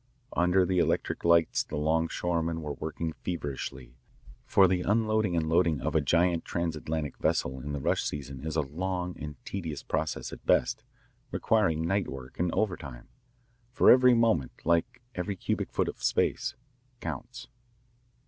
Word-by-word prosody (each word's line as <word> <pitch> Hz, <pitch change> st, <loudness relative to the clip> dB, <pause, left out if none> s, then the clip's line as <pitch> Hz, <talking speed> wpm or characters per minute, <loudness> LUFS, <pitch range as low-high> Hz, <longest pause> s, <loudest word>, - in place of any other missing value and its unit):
Under 90 Hz, +1 st, +4 dB
the 90 Hz, 0 st, +1 dB
electric -, -, 0 dB
lights 85 Hz, -1 st, +4 dB
the -, -, -7 dB
longshoremen 80 Hz, +1 st, 0 dB
were 75 Hz, -1 st, -3 dB
working 80 Hz, +2 st, -4 dB
feverishly, 65 Hz, -6 st, -5 dB, 0.5 s
for 95 Hz, -1 st, +6 dB
the 90 Hz, 0 st, +1 dB
unloading 110 Hz, -2 st, +1 dB
and 80 Hz, -1 st, 0 dB
loading 85 Hz, -2 st, +3 dB
of -, -, -2 dB
a -, -, +3 dB
giant 85 Hz, -1 st, +2 dB
transAtlantic 80 Hz, -3 st, -3 dB
vessel 65 Hz, +1 st, 0 dB
in 70 Hz, +3 st, -6 dB
the 70 Hz, -, -2 dB
rush -, -, +1 dB
season 70 Hz, -2 st, -5 dB
is 80 Hz, 0 st, -3 dB
a 80 Hz, -, +3 dB
long 90 Hz, +5 st, -3 dB
and 75 Hz, 0 st, -5 dB
tedious 80 Hz, -7 st, -5 dB
process -, -, -2 dB
at -, -, -10 dB
best, -, -, +2 dB, 0.5 s
requiring 85 Hz, -8 st, +1 dB
night 95 Hz, +3 st, +1 dB
work 65 Hz, -1 st, -9 dB
and 90 Hz, 0 st, +1 dB
overtime, 70 Hz, -, -3 dB, 0.6 s
for 125 Hz, -, +6 dB
every 125 Hz, -1 st, +7 dB
moment, 110 Hz, -, +2 dB
like 85 Hz, +7 st, +1 dB
every 90 Hz, +2 st, -3 dB
cubic 90 Hz, -, -2 dB
foot -, -, 0 dB
of -, -, -6 dB
space, -, -, +1 dB, 0.4 s
counts. 125 Hz, +1 st, -6 dB
85 Hz, 150 wpm, -29 LUFS, 75-90 Hz, 0.6 s, every